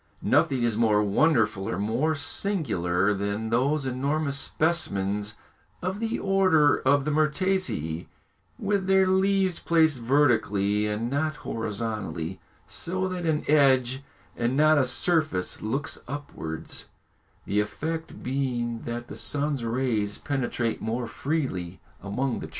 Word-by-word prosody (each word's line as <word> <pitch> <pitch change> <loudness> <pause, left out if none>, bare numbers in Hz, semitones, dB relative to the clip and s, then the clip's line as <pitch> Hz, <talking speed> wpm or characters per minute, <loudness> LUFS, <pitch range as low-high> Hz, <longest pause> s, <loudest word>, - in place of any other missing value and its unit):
Nothing 140 -3 +2
is 115 -2 +1
more 105 -2 +4
wonderful 105 -3 +2
or - - -2
more 120 +10 0
singular 105 - 0
than 100 +3 -3
those 135 +5 +1
enormous 140 +3 -1
specimens 105 - 0 0.4
of 185 +2 -3
the 225 0 -1
order 185 -7 +3
of 140 +1 +2
the 150 - 0
myrtaceæ, 150 - 0 0.5
with 200 -2 -1
their 190 0 +5
leaves 190 -1 +2
placed 160 -5 +3
vertically 110 -6 +2
and 105 +2 -2
not 155 +2 0
horizontally, 105 -6 -4 0.3
so 185 +2 -3
that 180 -2 -3
an 155 -1 0
edge 135 -3 +3 0.3
and 120 +3 0
not 155 0 +5
a 130 - +3
surface 155 - +1
looks 135 +7 -3
upwards, 130 - -6 0.6
the 105 - 0
effect 160 +10 -4
being 125 -3 -2
that 120 0 -4
the - - -8
sun's 145 -3 -1
rays 115 -3 -1
penetrate 120 -4 -2
more 120 +2 -2
freely 115 - -3 0.2
among 120 +6 -2
the - - -6
trees. - - -16
130 Hz, 125 wpm, -26 LUFS, 110-155 Hz, 0.6 s, their